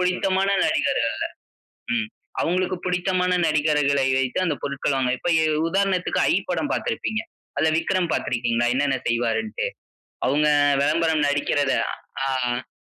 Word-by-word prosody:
புடித்தமான 190 Hz, +1 st, +1 dB, 0.2 s
நடிகர்கள -, -, +1 dB, 0.9 s
ம், 220 Hz, -3 st, 0 dB, 0.4 s
அவங்களுக்கு 185 Hz, +2 st, 0 dB
புடித்தமான 180 Hz, 0 st, 0 dB, 0.2 s
நடிகர்களை 150 Hz, -3 st, +2 dB
வைத்து 130 Hz, -2 st, -1 dB
அந்த 155 Hz, -5 st, -1 dB
பொருட்களமை 135 Hz, -2 st, 0 dB
இப்ப -, -, -2 dB, 0.4 s
உதாரணத்துக்கு 195 Hz, -1 st, +1 dB
"ஐ" -, -, +3 dB, 0.2 s
படம் -, -, -1 dB
பார்த்திருப்பீங்க, 220 Hz, 0 st, -2 dB, 0.4 s
அதுல 155 Hz, +3 st, +3 dB
விக்ரம் 170 Hz, +1 st, 0 dB
பார்த்ருக்கீங்களா, 120 Hz, -1 st, 0 dB
என்னென்ன 135 Hz, 0 st, +1 dB
செய்வார்னுட்டு. 120 Hz, -, -1 dB, 0.6 s
அவங்க 145 Hz, +3 st, +2 dB, 0.4 s
வெளம்பரம் 155 Hz, +1 st, +2 dB
நடிக்கிறத 145 Hz, -1 st, +1 dB, 0.6 s
ஆ -, -, 0 dB, 0.2 s
அ. 125 Hz, +1 st, -4 dB
155 Hz, 110 wpm, -23 LUFS, 135-180 Hz, 0.9 s, ஐ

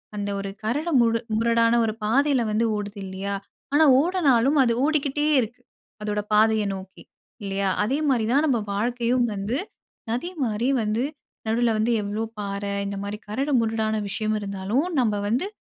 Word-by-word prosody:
அந்த 205 Hz, -1 st, -3 dB
ஒரு 195 Hz, 0 st, -4 dB
கரடு 290 Hz, +10 st, -1 dB
முடு 230 Hz, -1 st, +2 dB, 0.2 s
முரடான 230 Hz, 0 st, +3 dB
ஒரு 215 Hz, -, -1 dB
பாதையில 270 Hz, +4 st, +3 dB
வந்து 220 Hz, +2 st, +1 dB
ஓடுது. 205 Hz, 0 st, -5 dB
இல்லையா! 190 Hz, +1 st, -4 dB, 0.4 s
ஆனா 310 Hz, +2 st, +6 dB
ஓடுனாலும், 290 Hz, -5 st, +3 dB
அது 235 Hz, -2 st, +2 dB
ஓடிக்கிட்டே 295 Hz, -1 st, 0 dB
இருக்கு, 240 Hz, +2 st, -6 dB, 0.4 s
அதோட 210 Hz, 0 st, -1 dB
பாதைய 220 Hz, 0 st, +4 dB
நோக்கி. 190 Hz, 0 st, -11 dB, 0.4 s
இல்லையா? 195 Hz, 0 st, -1 dB
அதே 265 Hz, +8 st, 0 dB
மாரி 240 Hz, -5 st, +2 dB
தான் 290 Hz, +3 st, +4 dB
நம்ம 250 Hz, -5 st, +2 dB
வாழ்க்கையும் 240 Hz, +3 st, +1 dB
வந்து, 205 Hz, +5 st, -2 dB, 0.5 s
நதி 250 Hz, +10 st, -2 dB
மாரி 225 Hz, +3 st, 0 dB
வந்து 215 Hz, +2 st, 0 dB, 0.4 s
நடுவுல 230 Hz, +1 st, +2 dB
வந்து, 230 Hz, +2 st, +2 dB
எவ்வளோ 205 Hz, +2 st, -2 dB, 0.2 s
பாறை 200 Hz, 0 st, -3 dB
இந்த 200 Hz, 0 st, -4 dB
மாரி 205 Hz, +1 st, -5 dB
கரடு 275 Hz, +7 st, -1 dB
முரடான 220 Hz, -1 st, 0 dB
விஷயம் 215 Hz, +1 st, -1 dB
இருந்தாலும், 200 Hz, -, -1 dB
நம்ப 215 Hz, -4 st, +1 dB
வந்து 250 Hz, -, 0 dB
225 Hz, 155 wpm, -24 LUFS, 205-255 Hz, 0.5 s, ஆனா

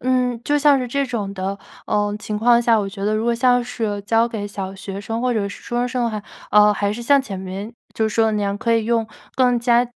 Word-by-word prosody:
嗯， 250 Hz, -2 st, 0 dB
就 295 Hz, 0 st, +2 dB
像 290 Hz, -1 st, +5 dB
是 250 Hz, -, -2 dB
这 280 Hz, +3 st, 0 dB
种 210 Hz, -5 st, -3 dB
的， 195 Hz, +1 st, -3 dB, 0.3 s
呃， 205 Hz, 0 st, 0 dB
情 210 Hz, 0 st, -4 dB
况 235 Hz, +2 st, +5 dB
下， 230 Hz, -2 st, +3 dB
我 200 Hz, -2 st, -1 dB
觉 195 Hz, 0 st, -6 dB
得 210 Hz, +1 st, +1 dB
如 220 Hz, +1 st, -1 dB
果 235 Hz, 0 st, +2 dB
像 245 Hz, 0 st, +3 dB
是 220 Hz, -4 st, -3 dB
教 225 Hz, +3 st, +2 dB
给 220 Hz, -3 st, -4 dB
小 195 Hz, -1 st, -6 dB
学 195 Hz, 0 st, -7 dB
生 225 Hz, +3 st, -4 dB
或 250 Hz, 0 st, +1 dB
者 205 Hz, -3 st, -1 dB
是 -, -, -10 dB
初 240 Hz, -, -7 dB
中 245 Hz, +1 st, +1 dB
生 250 Hz, -1 st, -1 dB
的 235 Hz, -, 0 dB
话， 210 Hz, -1 st, -4 dB, 0.3 s
呃， 210 Hz, 0 st, +6 dB
还 205 Hz, 0 st, -1 dB
是 235 Hz, +3 st, -6 dB
像 280 Hz, +3 st, +4 dB
前 200 Hz, -8 st, -6 dB
面， 190 Hz, +4 st, -6 dB, 0.2 s
就 220 Hz, -1 st, +1 dB
是 -, -, -6 dB
说 225 Hz, -1 st, +3 dB
的 220 Hz, -, +1 dB
那 210 Hz, -, 0 dB
样 200 Hz, 0 st, -1 dB
可 230 Hz, +1 st, +1 dB
以 225 Hz, -1 st, +1 dB
用 230 Hz, -1 st, +1 dB, 0.3 s
更 250 Hz, -2 st, +3 dB
加， 240 Hz, 0 st, +3 dB
225 Hz, 290 characters per minute, -21 LUFS, 205-245 Hz, 0.3 s, 呃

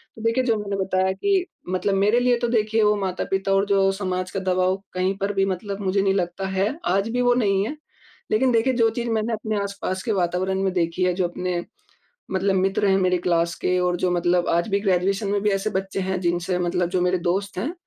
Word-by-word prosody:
तो 225 Hz, -, -11 dB
देखिए 230 Hz, +3 st, +2 dB
जो 235 Hz, -3 st, +2 dB
मैंने 200 Hz, -1 st, -3 dB
बताया 190 Hz, 0 st, +1 dB
कि, 375 Hz, -, +1 dB, 0.2 s
मतलब 185 Hz, +2 st, 0 dB
मेरे 210 Hz, +5 st, +3 dB
लिए 245 Hz, 0 st, +3 dB
तो 240 Hz, -, 0 dB
देखिए 220 Hz, -1 st, +1 dB
वो 210 Hz, 0 st, +4 dB
माता-पिता 195 Hz, 0 st, -1 dB
और 195 Hz, +1 st, +3 dB
जो 195 Hz, -1 st, +3 dB
समाज 185 Hz, -2 st, -3 dB
का 195 Hz, -, -2 dB
दबाव 185 Hz, 0 st, +1 dB, 0.2 s
कहीं 185 Hz, +1 st, 0 dB
पर 200 Hz, +1 st, -2 dB
भी 195 Hz, -1 st, +2 dB
मतलब 195 Hz, +1 st, -4 dB
मुझे 195 Hz, 0 st, +1 dB
नहीं 195 Hz, 0 st, +2 dB
लगता 190 Hz, 0 st, -2 dB
है, 190 Hz, +1 st, +1 dB, 0.2 s
आज 195 Hz, +4 st, +1 dB
भी 245 Hz, +2 st, 0 dB
वो 245 Hz, 0 st, +4 dB
नहीं 200 Hz, -5 st, +2 dB
है। 295 Hz, -, -4 dB, 0.6 s
लेकिन 255 Hz, +4 st, +3 dB
देखिए 235 Hz, +3 st, +2 dB
जो 230 Hz, -2 st, +3 dB
चीज़ 235 Hz, +1 st, -3 dB
मैंने 225 Hz, 0 st, 0 dB
अपने 215 Hz, -1 st, -2 dB
आस-पास 200 Hz, -2 st, -4 dB
के 235 Hz, -, -1 dB
वातावरण 185 Hz, 0 st, 0 dB
में 190 Hz, -, +1 dB
देखी 175 Hz, 0 st, 0 dB
है, 180 Hz, -, +2 dB
जो 180 Hz, 0 st, 0 dB
अपने 175 Hz, 0 st, -3 dB, 0.7 s
मतलब 190 Hz, +1 st, +1 dB
मित्र 195 Hz, +2 st, +1 dB
हैं 190 Hz, 0 st, +4 dB
मेरी 185 Hz, -1 st, +2 dB
क्लास 170 Hz, -1 st, +1 dB
के 180 Hz, -, +2 dB
और 180 Hz, 0 st, +1 dB
जो 180 Hz, 0 st, 0 dB
मतलब 175 Hz, 0 st, +1 dB
आज 170 Hz, +3 st, +1 dB
भी 200 Hz, 0 st, +1 dB
ग्रेजुएशन 195 Hz, +1 st, +1 dB
में 205 Hz, 0 st, 0 dB
भी 210 Hz, -, +2 dB
ऐसे 195 Hz, +2 st, 0 dB
बच्चे 195 Hz, +1 st, -3 dB
हैं 190 Hz, 0 st, -2 dB
जिनसे 175 Hz, +1 st, 0 dB
मतलब 175 Hz, 0 st, 0 dB
जो 185 Hz, 0 st, 0 dB
मेरे 180 Hz, +1 st, +2 dB
दोस्त 190 Hz, +3 st, -2 dB
हैं 250 Hz, -, -2 dB
195 Hz, 230 wpm, -23 LUFS, 185-210 Hz, 0.7 s, वो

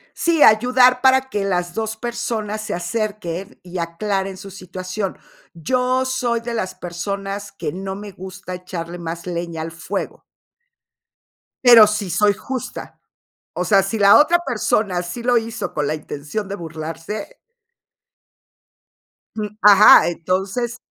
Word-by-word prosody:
Sí, 335 Hz, -3 st, +3 dB
ayudar 250 Hz, +3 st, +5 dB
para 265 Hz, 0 st, +4 dB
que 205 Hz, -5 st, -2 dB
las 180 Hz, -2 st, -1 dB
2 220 Hz, +1 st, -3 dB
personas 220 Hz, -2 st, -3 dB
se 215 Hz, -1 st, -4 dB
acerquen 185 Hz, 0 st, -4 dB
y 180 Hz, 0 st, -7 dB
aclaren 190 Hz, +3 st, -2 dB
su 195 Hz, 0 st, -10 dB
situación. 185 Hz, +1 st, -5 dB, 0.4 s
Yo 255 Hz, +9 st, 0 dB
soy 250 Hz, -3 st, -1 dB
de 235 Hz, 0 st, -5 dB
las 215 Hz, -5 st, -3 dB
personas 195 Hz, +3 st, -5 dB
que 175 Hz, -, -5 dB
no 190 Hz, +2 st, -5 dB
me 205 Hz, +1 st, -8 dB
gusta 185 Hz, 0 st, -8 dB
echarle 175 Hz, -1 st, -7 dB
más 170 Hz, 0 st, -6 dB
leña 170 Hz, -2 st, -4 dB
al 165 Hz, +1 st, -5 dB
fuego. 160 Hz, -1 st, -5 dB, 1.4 s
Pero, 235 Hz, -4 st, +9 dB
sí 210 Hz, -2 st, -2 dB
soy 205 Hz, +4 st, +3 dB
justa, 255 Hz, +5 st, -7 dB, 0.6 s
o 180 Hz, -, -2 dB
sea, 195 Hz, +2 st, +4 dB
si 195 Hz, +3 st, -3 dB
la 200 Hz, +3 st, +7 dB
otra 335 Hz, +4 st, +4 dB
persona 215 Hz, -6 st, 0 dB
sí 180 Hz, +7 st, -6 dB
lo 245 Hz, 0 st, +3 dB
hizo 225 Hz, 0 st, -5 dB
con 150 Hz, -1 st, -1 dB
la 155 Hz, -, -1 dB
intención 150 Hz, +6 st, -5 dB
de 200 Hz, -, -4 dB
burlarse 165 Hz, +4 st, -7 dB, 2.0 s
Mm, 210 Hz, 0 st, -5 dB
ajá, 205 Hz, 0 st, +8 dB
entonces 190 Hz, +8 st, -2 dB
200 Hz, 140 wpm, -20 LUFS, 175-225 Hz, 2.0 s, Pero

